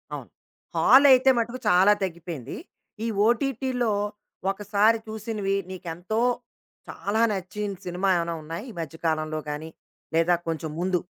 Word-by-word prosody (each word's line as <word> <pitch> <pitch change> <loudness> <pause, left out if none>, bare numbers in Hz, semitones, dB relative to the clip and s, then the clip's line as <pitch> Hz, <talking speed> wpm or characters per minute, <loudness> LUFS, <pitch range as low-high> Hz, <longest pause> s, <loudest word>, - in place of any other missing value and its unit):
అవును. - - -8 0.5
హాలయితే 265 -1 +7
మటుకు 235 +2 -1
చాలా 185 +3 +6
తగ్గిపోయింది. 170 -7 -5 0.5
ఈ - - 0 0.2
ఓటీటీలో 250 -1 0 0.6
ఒకసారి 210 +3 +2
చూసినవి 215 -2 -2
నీకెంతో 180 +4 -4 0.7
చాలా 215 +3 -1
నచ్చిన 200 +1 -3
సినిమా 180 +2 -1
ఏమైనా 170 0 -1
ఉన్నాయి 165 +6 -6
ఈ - - -12
మధ్య 165 0 -7
కాలంలో 155 0 -1
గానీ 150 +2 -5 0.4
లేదా, 165 +2 +4
కొంచెం 160 -1 -2
ముందు? 180 0 +1
195 Hz, 120 wpm, -26 LUFS, 170-220 Hz, 0.7 s, హాలయితే